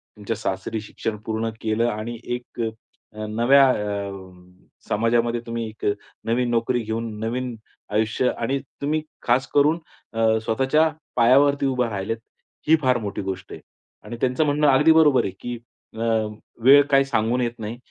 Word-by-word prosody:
तुमच्या 105 -2 -4
सासरी 95 +4 -3
शिक्षण 105 +1 -5
पूर्ण 110 +1 -1
केलं 110 +2 +1
आणि 115 +2 -4
एक 120 0 -5 0.7
नव्या 130 +5 +5
अ, 100 -4 -2 0.8
समाजामध्ये 115 +2 +1
तुम्ही 115 -1 -3
एक 110 - -9 0.4
नवीन 120 +2 +1
नोकरी 120 +1 +1
घेऊन, 110 0 -4
नवीन 120 +2 -3 0.4
आयुष्य 110 +4 +1
आणि 135 +4 -1 0.2
तुम्ही 155 +2 0 0.2
खास 125 +2 +2
करून 150 +3 +4 0.3
अ, 110 0 +3
स्वतःच्या 135 +8 +2 0.3
पायावरती 140 +4 +4
उभे 125 -3 +1
राहिलेत 100 +2 -3 0.5
ही 160 - +7
फार 130 -3 +3
मोठी 105 -4 -4
गोष्ट 95 -1 -5
आहे. - - -8 0.4
आणि 120 - -7
त्यांचं 130 +4 +2
म्हणणं 150 +1 +2
अगदी 145 +4 +5
बरोबर 155 -4 +5
आहे, - - -2
की 120 0 -5 0.4
अ, - - -8 0.6
वेळ 140 +3 +8
काही 135 0 +5
सांगून 120 -1 0
येत 120 -1 -3
नाही, 110 +2 -5
120 Hz, 145 wpm, -23 LUFS, 110-135 Hz, 0.8 s, वेळ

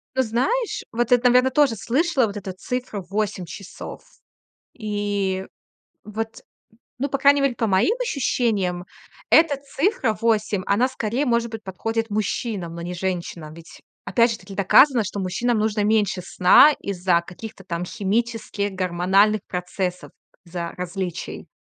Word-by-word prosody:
Ты 260 - +3
знаешь, 390 - -1
вот 240 +1 -1
это, 245 0 +5
наверно, 250 +1 +4
тоже 280 -4 +3
слышала 265 - +1
вот 205 0 -6
эту 195 -1 -5
цифру- 220 -1 -4
8 200 -3 -2
часов. 190 +3 -9 0.8
И 205 -3 -2 0.6
вот, 220 +1 -5 0.6
ну, 275 +3 -1
по 275 - -1
крайней 280 +1 +5
мере, 275 -3 +1
по 225 - 0
моим 200 - +3
ощущениям, 220 - 0 0.4
эта 315 -3 +5
цифра 275 - -1
8, 215 -4 +1
она 230 +6 +2
скорее, 255 +2 -2
может 235 -2 +1
быть, 220 -1 -7
подходит 225 +4 -3
мужчинам, 205 -4 -2
но 170 - -6
не 175 +1 -5
женщинам. 175 -4 -4
Ведь 165 0 -13 0.3
опять 235 -1 +3
же 220 - -3
таки 195 - -12
доказано, 235 +6 +5
что 200 0 -5
мужчинам 210 +6 0
нужно 215 -1 0
меньше 205 -3 +1
сна 185 +11 +6
из-за 180 -3 +1
каких-то 195 +3 -10
там 175 -1 -4
химических, 210 0 -2
гормональных 190 +3 +2
процессов, 180 0 -4 0.3
за 170 -1 -5
различий. 180 -1 -5
210 Hz, 140 wpm, -23 LUFS, 185-240 Hz, 0.8 s, сна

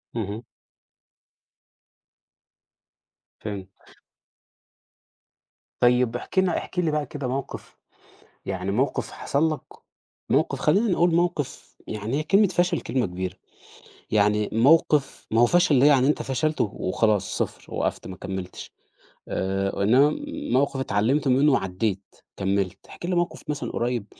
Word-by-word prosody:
اهم. 110 +1 -4 3.0
فهمت. 100 -3 -9 1.8
طيب 120 -1 +3
احكِ 190 +9 -2
لنا 185 -2 +2
احكِ 180 - -4
لي 165 -3 +1
بقى 150 -1 -1
كده 140 -4 -5
موقف، 135 +2 -5 0.7
يعني 95 0 -3
موقف 130 +6 -1
حصل 155 +3 0
لَك، 140 - -7 0.7
موقف 140 -1 +1
خلّينا 195 +11 +3
نقول 175 -1 +3
موقف 170 -5 -2
يعني 110 +6 -3
هي - - -2
كلمة 200 +5 +4
فشل 175 0 +1
كلمة 130 -2 -1
كبيرة 90 +1 -4 0.8
يعني 105 0 +2
موقف 140 +4 +3
ما 115 +1 +3
هو 120 - +7
فشل 175 -6 +4
ده 140 - +6
يعني 135 -3 +5
أنت 150 - +1
فشلت 155 +4 -1
وخلاص 105 0 0
0 - - -4
وقفت - - -2
ما 95 - -7
كملّتش 95 -1 -7 0.6
آآ، 95 +1 -1
إنما 135 +8 +4 0.3
موقف 135 +1 +2
اتعلمت 130 +5 +1
منه 135 +3 +4
وعدّيت، 95 -2 -2 0.2
كملّت. 95 -1 -1
احكِ - - -9
لي 180 0 -1
موقف 175 0 -1
مثلًا 145 - -3
قُريب 120 -3 -1
125 Hz, 125 wpm, -25 LUFS, 100-150 Hz, 3.0 s, هو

